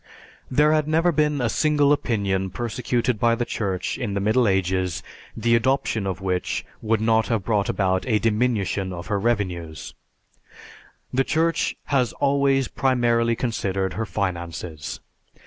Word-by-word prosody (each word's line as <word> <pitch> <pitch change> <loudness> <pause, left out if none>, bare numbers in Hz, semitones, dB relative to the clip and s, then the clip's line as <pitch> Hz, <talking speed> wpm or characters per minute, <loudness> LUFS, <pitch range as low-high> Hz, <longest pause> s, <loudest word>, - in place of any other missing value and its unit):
There 150 +4 +4
had 155 -1 +1
never 165 +3 +3
been 150 -3 +1
a 120 - +2
single 145 +3 +3
opinion 100 -8 -1
persecuted 120 +2 -1
by 115 +1 +3
the 120 +1 -2
Church 95 0 -3
in 110 -6 -2
the - - 0
Middle 110 +4 +2
Ages 95 -2 0 0.3
the 115 0 +3
adoption 115 -4 +1
of 95 -1 -3
which 90 -1 -2 0.2
would 110 0 +1
not 110 0 +2
have 115 -5 0
brought 105 -2 0
about 95 +2 0
a 110 -4 +3
diminution 105 -4 0
of 85 0 -7
her 100 - +1
revenues; 90 -8 -2 1.2
the 135 +1 +3
Church 165 +4 0 0.2
has 125 -4 +2
always 140 -1 +2
primarily 120 -3 +1
considered 95 -6 -2
her 110 0 -3
finances. 85 -6 -4
115 Hz, 145 wpm, -23 LUFS, 95-130 Hz, 1.2 s, There